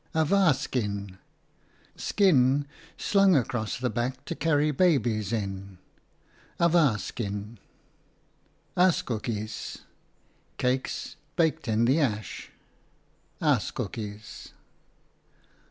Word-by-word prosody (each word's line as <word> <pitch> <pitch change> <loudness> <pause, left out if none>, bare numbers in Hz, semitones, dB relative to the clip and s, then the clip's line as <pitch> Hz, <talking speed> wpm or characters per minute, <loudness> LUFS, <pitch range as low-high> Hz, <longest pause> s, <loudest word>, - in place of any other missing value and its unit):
Awa 160 0 +4
skin, 100 -8 -3 0.8
skin 145 -8 +3 0.3
slung 195 -3 +4
across 120 -5 0
the 125 -1 -1
back 125 +4 -3
to - - -3
carry 150 -2 +2
babies 120 - +2
in. 100 -3 -4 0.8
Askoekies, 115 - +1 3.0
cakes 130 +1 -1 0.2
baked 160 -3 +1
in 110 +1 +2
the 135 +6 +3
ash. 110 - -2 0.9
Baas, - - +2
master. 105 -1 -6
125 Hz, 75 wpm, -27 LUFS, 105-155 Hz, 3.0 s, Awa